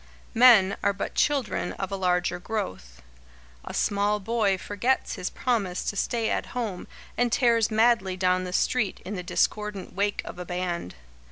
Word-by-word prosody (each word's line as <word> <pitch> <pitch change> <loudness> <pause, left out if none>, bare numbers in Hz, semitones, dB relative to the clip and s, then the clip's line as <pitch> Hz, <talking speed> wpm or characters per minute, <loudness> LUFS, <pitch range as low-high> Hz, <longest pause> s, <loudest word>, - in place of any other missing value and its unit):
Men 225 -5 +6
are 200 - +2
but 200 - -5
children 270 -11 0
of 190 -1 -5
a - - -1
larger 180 -2 0
growth. 90 - -5 0.6
A - - -7
small 205 +1 +1
boy 210 -2 +1
forgets 205 +7 -1
his - - -3
promise 210 -8 -1
to - - -3
stay 230 +2 -1
at - - -1
home 215 -7 -3 0.3
and 245 -1 +2
tears 230 -3 +3
madly 220 -4 +2
down 185 0 +2
the 180 - -5
street 215 +2 0
in 200 - -5
the 180 - -4
discordant 210 +2 -1
wake 200 +2 -1
of - - -8
a 180 - -5
band. 175 - -3
200 Hz, 165 wpm, -26 LUFS, 185-225 Hz, 0.6 s, Men